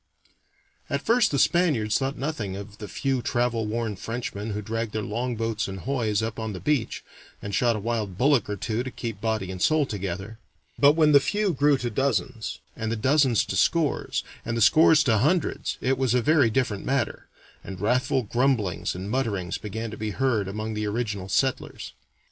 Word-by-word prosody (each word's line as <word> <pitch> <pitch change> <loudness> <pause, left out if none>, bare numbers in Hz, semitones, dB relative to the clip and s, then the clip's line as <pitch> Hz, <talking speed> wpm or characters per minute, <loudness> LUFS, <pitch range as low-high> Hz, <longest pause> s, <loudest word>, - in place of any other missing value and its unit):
] - - -38
At - - -2
first 235 -1 +4
the 140 - -1
Spaniards 135 -11 +2
thought 135 +1 -2
nothing 125 -10 -3
of 100 +1 -9
the 105 - -6
few 130 +6 -1
travel 120 -2 0
worn 110 -1 -2
Frenchmen 115 0 -5
who 105 0 -3
dragged 115 +1 -3
their 110 - -2
longboats 115 0 -2
and 95 -1 -6
hoys 110 -4 0
up 110 0 -4
on 110 -1 -3
the 95 - -6
beach, 145 -2 -1 0.4
and 100 - -6
shot 120 +1 +2
a - - -3
wild 105 -4 -2
bullock 135 -3 +3
or 105 - -1
two 110 +3 -2
to 130 - -4
keep 115 -5 -6
body 110 -4 -1
and 90 -1 -7
soul 155 +3 +3
together; 100 0 -5 0.4
but 145 0 +7
when 155 -1 +4
the 140 - +8
few 205 +5 0
grew 145 0 +3
to 120 -2 -3
dozens, 125 -1 -1 0.2
and 110 -1 -3
the - - 0
dozens 130 -1 +3
to - - -4
scores, 165 -4 +1 0.2
and 115 0 -2
the - - 0
scores 155 +7 +6
to 110 -7 +3
hundreds, 160 - 0
it 130 0 +1
was 130 -2 +2
a 125 - +3
very 145 -5 +4
different 110 -4 -1
matter, 135 +1 -1 0.4
and 95 -2 -8
wrathful 125 +5 +1
grumblings 120 -6 0
and 95 +3 -5
mutterings 105 -9 -1
began 110 +2 -5
to 110 - -7
be 110 0 -3
heard 110 -3 0
among 110 +3 -4
the 105 0 -2
original 105 -3 -3
settlers. 130 +6 -1
115 Hz, 195 wpm, -25 LUFS, 105-135 Hz, 0.4 s, the